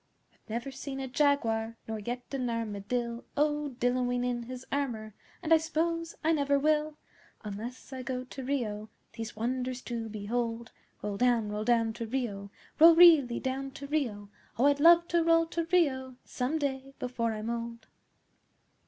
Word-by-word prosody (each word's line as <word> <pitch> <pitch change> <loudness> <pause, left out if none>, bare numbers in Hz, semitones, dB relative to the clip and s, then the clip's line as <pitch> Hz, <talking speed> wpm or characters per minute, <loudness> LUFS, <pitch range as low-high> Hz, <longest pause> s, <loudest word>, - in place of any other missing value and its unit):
I've - - -33
never 235 +5 -3
seen 270 0 -6
a 265 - -3
Jaguar, 230 -5 +1
Nor 220 -1 -3
yet 245 +4 -4
an 255 -3 -1
Armadill 230 +1 -3
O 295 -2 0
dilloing 245 0 +1
in 245 -1 -1
his 255 0 -7
armour, 235 -7 -2 0.3
And 325 0 +4
I - - +8
s'pose 330 +1 -2
I 320 - +3
never 285 -3 +2
will, 305 +1 +1 0.5
Unless 225 +6 -7
I 260 - -5
go 255 0 -3
to 260 +1 -8
Rio 220 -6 -2 0.2
These 225 0 -6
wonders 250 +3 -2
to 230 -2 -4
behold 230 +2 -3 0.3
Roll 205 -1 -3
down 240 -3 +2
roll 210 +1 -3
down 230 -2 +2
to 230 0 -5
Rio 215 -5 -3 0.3
Roll 330 +1 +9
really 320 -8 +7
down 270 +1 -3
to 280 - -8
Rio! 235 -9 -2 0.3
Oh, 245 - +3
I'd 285 0 +4
love 340 +2 +7
to 340 -1 +3
roll 330 0 +4
to 335 0 -2
Rio 260 -7 +2
Some 260 +5 -2
day 275 -2 -3
before 235 -2 -2
I'm 215 +2 -4
old! 235 -1 -5
250 Hz, 165 wpm, -30 LUFS, 230-285 Hz, 0.5 s, Roll